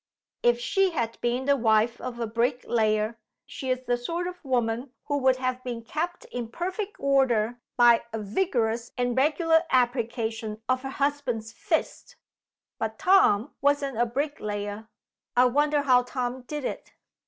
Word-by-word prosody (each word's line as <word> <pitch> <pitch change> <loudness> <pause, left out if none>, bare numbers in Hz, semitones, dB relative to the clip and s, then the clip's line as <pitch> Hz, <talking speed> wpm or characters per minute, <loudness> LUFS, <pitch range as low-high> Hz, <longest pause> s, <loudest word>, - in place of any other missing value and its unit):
If 240 0 +3
she 390 +10 +2
had 235 -9 -3
been 245 +2 0
the 280 0 +4
wife 225 -1 +2
of 245 -2 -6
a 235 - 0
bricklayer, 230 -2 0 0.3
she 280 -2 -6
is 255 0 -1
the 245 -1 +1
sort 335 +9 -3
of 360 0 -7
woman 245 -1 0 0.2
who 285 -1 0
would 260 -1 +4
have 255 0 -2
been 240 -2 -5
kept 335 +8 -4
in 245 -2 -4
perfect 375 - -4
order 245 -4 +2 0.2
by 240 -1 +6
a 225 - -3
vigorous 230 - -1
and 245 -1 0
regular 320 +4 +3
application 230 -3 0
of 255 0 +1
her 270 - -5
husband's 265 -6 -2
fist. - - -2 0.6
But 220 0 -3
Tom 300 - +4
wasn't 280 -4 +1
a 240 - +3
bricklayer. 220 -6 -3 0.5
I 250 - +7
wonder 290 +3 +2
how 255 -3 +5
Tom 250 0 -3
did 295 -3 -4
it?" - - -5
250 Hz, 155 wpm, -26 LUFS, 230-280 Hz, 0.6 s, I